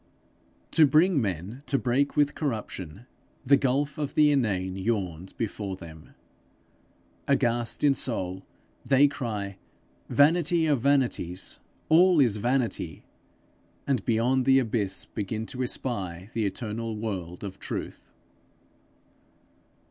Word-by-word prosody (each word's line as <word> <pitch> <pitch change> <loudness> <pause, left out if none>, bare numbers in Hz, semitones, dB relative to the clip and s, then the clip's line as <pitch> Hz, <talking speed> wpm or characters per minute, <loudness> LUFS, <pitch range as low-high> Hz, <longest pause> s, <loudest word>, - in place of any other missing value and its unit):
To 155 -2 +6
bring 160 +1 +4
men 100 - -4
to 140 - +2
break 135 +3 0
with 145 -1 +3
corruption, 110 - -5 0.4
the 140 +2 +6
gulf 140 +2 0
of 145 -1 -3
the 150 -1 +5
inane 95 -9 0
yawns 95 -4 -2
before 105 -3 -4
them. 80 -4 -13 1.1
Aghast 120 -3 0
in 145 -2 +5
soul, 95 -8 -3 0.4
they 140 +1 +5
cry, 105 -8 -4 0.5
'Vanity 165 +3 +3
of 145 -6 +2
vanities! 125 -10 0 0.3
all 175 +1 +5
is 120 -7 +4
vanity!' 115 - -1 0.8
and 130 -7 0
beyond 120 +3 +1
the 135 0 +5
abyss 110 -6 0
begin 110 +1 -4
to 130 +2 -5
espy 100 -8 -3
the 110 -3 0
eternal 110 +2 -4
world 95 -5 -5
of 100 -1 -7
truth. - - -6
115 Hz, 115 wpm, -27 LUFS, 100-140 Hz, 1.1 s, To